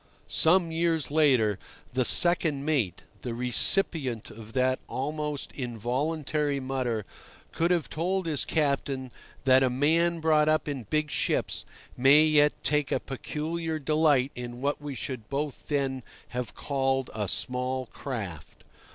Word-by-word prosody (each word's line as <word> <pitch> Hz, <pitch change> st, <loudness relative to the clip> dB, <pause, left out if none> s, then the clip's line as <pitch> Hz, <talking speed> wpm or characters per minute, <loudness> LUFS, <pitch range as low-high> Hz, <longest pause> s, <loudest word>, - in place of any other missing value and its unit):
Some 170 Hz, 0 st, +3 dB
years 160 Hz, -4 st, 0 dB
later, 130 Hz, -10 st, +3 dB, 0.3 s
the 130 Hz, +1 st, +1 dB
second 160 Hz, -4 st, +4 dB
mate, 135 Hz, -, 0 dB, 0.2 s
the 120 Hz, -2 st, -4 dB
recipient 125 Hz, -, +2 dB
of 110 Hz, 0 st, -12 dB
that 130 Hz, 0 st, +1 dB
almost 150 Hz, +1 st, -4 dB
involuntary 140 Hz, +4 st, -2 dB
mutter, 130 Hz, -5 st, -2 dB, 0.5 s
could 165 Hz, +1 st, 0 dB
have 175 Hz, -4 st, +1 dB
told 185 Hz, +4 st, -2 dB
his 155 Hz, -4 st, -1 dB
captain 140 Hz, -4 st, -1 dB, 0.3 s
that 130 Hz, 0 st, +5 dB
a 130 Hz, -, +3 dB
man 165 Hz, +6 st, +2 dB
brought 155 Hz, -1 st, +3 dB
up 155 Hz, 0 st, +1 dB
in 135 Hz, -7 st, -4 dB
big 155 Hz, -1 st, 0 dB
ships -, -, -1 dB, 0.3 s
may 135 Hz, +4 st, +6 dB
yet 150 Hz, -1 st, +4 dB
take 150 Hz, -2 st, +1 dB
a -, -, +1 dB
peculiar 160 Hz, +4 st, -4 dB
delight 150 Hz, -3 st, +2 dB
in 120 Hz, 0 st, -7 dB
what 145 Hz, +2 st, -1 dB
we 145 Hz, -2 st, -6 dB
should 125 Hz, -3 st, -6 dB
both 140 Hz, 0 st, -4 dB
then 135 Hz, -3 st, -1 dB, 0.3 s
have 125 Hz, -1 st, -5 dB
called 135 Hz, -2 st, -1 dB
a 105 Hz, -2 st, -2 dB
small 125 Hz, +7 st, -1 dB
craft. 100 Hz, -, -7 dB
140 Hz, 135 wpm, -27 LUFS, 125-155 Hz, 0.5 s, may